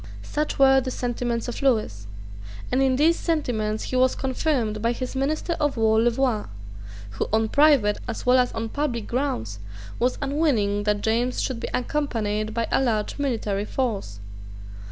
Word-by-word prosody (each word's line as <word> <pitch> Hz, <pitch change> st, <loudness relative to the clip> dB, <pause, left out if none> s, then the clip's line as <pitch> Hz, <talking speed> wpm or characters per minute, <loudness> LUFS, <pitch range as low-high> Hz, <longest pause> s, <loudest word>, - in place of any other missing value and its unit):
Such 300 Hz, +1 st, -2 dB
were 270 Hz, -1 st, +6 dB
the 260 Hz, -, -4 dB
sentiments 240 Hz, -1 st, -2 dB
of 245 Hz, -, -5 dB
Lewis; 215 Hz, -, 0 dB, 0.6 s
and 255 Hz, -, +2 dB
in 265 Hz, -1 st, +3 dB
these 320 Hz, +5 st, +3 dB
sentiments 220 Hz, -10 st, -1 dB
he -, -, -4 dB
was 255 Hz, 0 st, +3 dB
confirmed 255 Hz, -5 st, -1 dB
by 230 Hz, +2 st, +1 dB
his 255 Hz, +2 st, -5 dB
Minister 305 Hz, +5 st, -1 dB
of 290 Hz, -4 st, 0 dB
War 220 Hz, 0 st, +3 dB
Louvois, 240 Hz, -2 st, +1 dB, 0.7 s
who, 105 Hz, -, -3 dB
on 220 Hz, 0 st, +2 dB
private 280 Hz, -8 st, +4 dB
as 230 Hz, -, -5 dB
well 250 Hz, +1 st, +5 dB
as 250 Hz, -1 st, +2 dB
on 225 Hz, 0 st, -3 dB
public 250 Hz, -6 st, -2 dB
grounds, 115 Hz, -, -2 dB, 0.4 s
was 250 Hz, +1 st, +1 dB
unwilling 270 Hz, -9 st, 0 dB
that 210 Hz, -1 st, +1 dB
James 240 Hz, +3 st, 0 dB
should 255 Hz, -3 st, -2 dB
be -, -, -4 dB
accompanied 225 Hz, -6 st, -1 dB
by 230 Hz, +1 st, -1 dB
a -, -, +3 dB
large 225 Hz, -1 st, -1 dB
military 215 Hz, -7 st, -1 dB
force. 210 Hz, -, -3 dB
245 Hz, 160 wpm, -24 LUFS, 215-270 Hz, 0.7 s, were